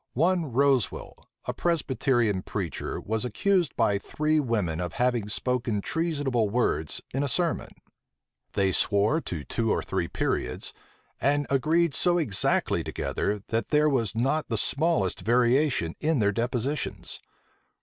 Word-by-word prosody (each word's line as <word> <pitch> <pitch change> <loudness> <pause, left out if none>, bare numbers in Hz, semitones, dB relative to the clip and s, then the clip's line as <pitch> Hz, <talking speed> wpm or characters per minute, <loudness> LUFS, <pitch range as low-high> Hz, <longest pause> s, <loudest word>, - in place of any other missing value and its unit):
One 165 +1 +1
Rosewel, 135 -3 0 0.2
a - - -2
Presbyterian 130 - +1
preacher, 95 -3 -4
was 110 0 -2
accused 175 - +1
by 100 -1 +2
three 155 +7 0
women 105 - -1
of 90 0 -3
having 120 -4 0
spoken 120 -1 -1
treasonable 145 -5 0
words 100 -9 0
in 135 - 0
a 145 - 0
sermon. 170 +6 0 0.8
They 95 -1 +2
swore 105 - +2
to 80 - -5
two 115 +6 -1
or - - +1
three - - -2
periods, - - -2 0.5
and 145 +1 +2
agreed 155 +4 +2
so 175 +4 +2
exactly 110 - +1
together, 105 -1 -2
that 115 0 0
there 150 0 +3
was 115 -7 0
not 135 +7 0
the 115 - 0
smallest 140 - +1
variation 120 - +2
in 155 0 +1
their 105 -3 +2
depositions. 125 +6 -3
125 Hz, 135 wpm, -27 LUFS, 105-150 Hz, 0.8 s, there